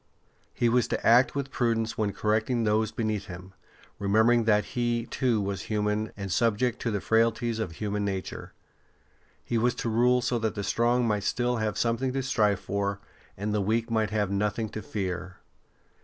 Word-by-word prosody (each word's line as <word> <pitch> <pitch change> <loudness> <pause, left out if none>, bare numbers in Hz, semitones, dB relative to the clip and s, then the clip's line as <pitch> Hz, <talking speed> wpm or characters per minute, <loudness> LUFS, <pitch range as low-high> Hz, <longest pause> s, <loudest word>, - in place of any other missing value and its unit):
He 120 - 0
was 120 0 +2
to - - -3
act 120 +5 +5
with 140 -1 -3
prudence 115 -2 0
when 105 -2 0
correcting 110 +4 0
those 110 0 +1
beneath 110 -3 -2
him, 90 -1 -10 0.5
remembering 110 +4 +3
that 105 -2 +3
he, 120 -1 0
too, 120 -2 0
was 100 -1 -2
human 105 0 0
and 100 -2 -5
subject 115 +4 +1
to 115 - -1
the 105 -2 -1
frailties 115 +1 +1
of 95 -7 -3
human 105 +3 -2
nature. 95 -2 -4 0.9
He 115 - 0
was 120 +2 +1
to 115 - -3
rule 125 +2 +3
so 125 -1 0
that 110 -1 -1
the 100 - -3
strong 120 +4 +2
might 105 -2 0
still 120 +4 0
have 110 -1 -2
something 120 +2 0
to 135 0 -1
strive 105 -6 +2
for, 100 +1 -2 0.4
and 105 +2 -2
the 105 - +1
weak 115 +3 0
might 110 -2 +1
have 105 -3 -1
nothing 105 +2 -1
to 110 - -6
fear. 95 -7 -4
110 Hz, 180 wpm, -27 LUFS, 105-120 Hz, 0.9 s, act